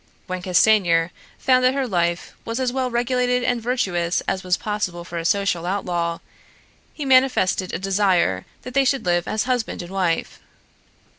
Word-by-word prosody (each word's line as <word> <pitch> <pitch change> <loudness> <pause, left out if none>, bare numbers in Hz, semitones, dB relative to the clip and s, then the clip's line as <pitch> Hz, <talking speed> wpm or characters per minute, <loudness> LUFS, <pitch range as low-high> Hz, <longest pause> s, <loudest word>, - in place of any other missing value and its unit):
When 185 -1 -4
Castanier 180 -3 +3 0.3
found 255 -1 +3
that 255 +1 +3
her 275 -1 0
life 175 -4 -1
was 230 +2 -4
as 255 -1 0
well 260 -1 -1
regulated 250 +1 0
and 245 -1 0
virtuous 190 -8 0
as 190 - -3
was 180 -1 +1
possible 190 -5 -3
for 170 -1 -6
a 165 - -5
social 180 -2 +1
outlaw, 175 -3 -1 0.7
he 295 - -6
manifested 255 -8 +3
a - - -2
desire 190 - +1 0.2
that 250 - -8
they 275 +1 +4
should 270 -3 0
live 175 0 +1
as 215 - 0
husband 245 -7 -2
and 175 - -10
wife. 180 -4 -1
195 Hz, 165 wpm, -22 LUFS, 175-250 Hz, 0.7 s, they